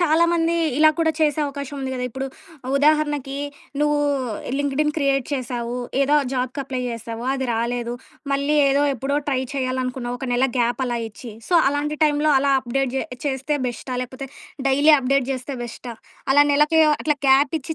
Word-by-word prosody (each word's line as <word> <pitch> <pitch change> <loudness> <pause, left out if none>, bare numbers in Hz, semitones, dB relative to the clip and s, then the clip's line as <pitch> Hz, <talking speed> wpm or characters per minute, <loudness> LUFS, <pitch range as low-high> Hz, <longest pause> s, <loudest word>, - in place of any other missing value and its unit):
చాలామంది 335 0 +3 0.2
ఇలా 310 0 +7
కూడా 320 -1 +3
చేసే 305 0 +2
అవకాశం 280 0 -6
ఉంది 265 -1 -3
గదా! 250 0 -3
ఇప్పుడు 265 +3 -4 0.5
ఉదాహరణకి 295 -2 +1 0.4
నువ్వు 295 0 +2 0.6
లింక్డ్‌ఇన్ 285 +2 0
క్రియేట్ 275 -3 +1
చేశావు. 245 -2 -3 0.3
ఏదో 290 +2 +2 0.2
జాబ్‌కి 255 +2 -2
అప్లై 260 -1 -4
చేసావు. 230 +1 -6
అది 265 -1 -2
రాలేదు. 235 +1 -2 0.4
మళ్ళీ 280 +2 +1
ఏదో 280 +1 +2
ఎప్పుడో 270 +4 -2
ట్రై 260 -2 +1
చేయాలనుకున్నావు. 255 -2 -2
ఒక 265 - -4
నెల 255 +2 +3
గ్యాప్ 240 +2 +1
అలా 240 -1 -1
ఇచ్చి. 220 +1 -10 0.2
సో 355 - +1 0.2
అలాంటి 295 +1 -2
టైంలో 300 0 +2
అలా 275 +1 +2
అప్డేట్ 260 +1 -1
జే - - 0 0.2
జేస్తే 280 +1 -1
బెస్టా, 250 +2 -5
లేకపోతే 260 +2 -7 0.4
డైలీ 285 +3 +5
అప్డేట్ 270 0 +1
జేస్తే 260 +1 -5
బెస్టా? 235 0 -8 0.4
అలా 290 +1 +6
నెలకి 300 +3 +4 0.2
అట్లా 300 -1 +1
గ్యాప్ 275 +2 +5
ఇచ్చి 320 +4 -5
270 Hz, 160 wpm, -22 LUFS, 255-295 Hz, 0.6 s, ఇలా